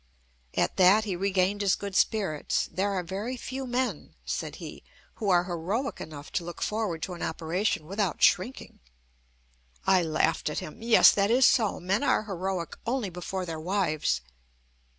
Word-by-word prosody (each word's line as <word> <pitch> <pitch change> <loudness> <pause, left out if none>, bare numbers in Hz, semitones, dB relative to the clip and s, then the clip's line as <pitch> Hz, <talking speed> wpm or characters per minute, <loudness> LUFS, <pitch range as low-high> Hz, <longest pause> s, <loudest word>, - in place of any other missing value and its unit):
At - - 0
that 195 +4 +6
he 195 -4 -2
regained 195 +2 +1
his 195 -2 +3
good 200 -2 -6
spirits: 195 -11 +1
"There 190 +4 0
are 185 -2 -1
very 200 +8 -4
few 260 +2 -5
men," 250 +1 -2
said - - -3
he, - - -9 0.4
"who 210 - -1
are 175 -1 +4
heroic 185 +9 -3
enough 150 -2 -9
to - - -1
look 175 0 -8
forward 210 -7 -2
to 185 - -3
an 175 - -9
operation 165 +1 -1
without 195 -1 -2
shrinking." 200 +7 +1 1.1
I 190 -1 +5
laughed 160 -1 0
at 150 - -5
him: 155 - -6
"Yes, 230 0 +7
that 200 0 +1
is 250 +2 +5
so. 220 -5 +3
Men 190 +4 0
are 285 - +2
heroic 190 -3 -3
only 235 -5 -1
before 180 +1 -4
their 165 -2 -5
wives!" 155 - 0
190 Hz, 165 wpm, -28 LUFS, 170-215 Hz, 1.1 s, Yes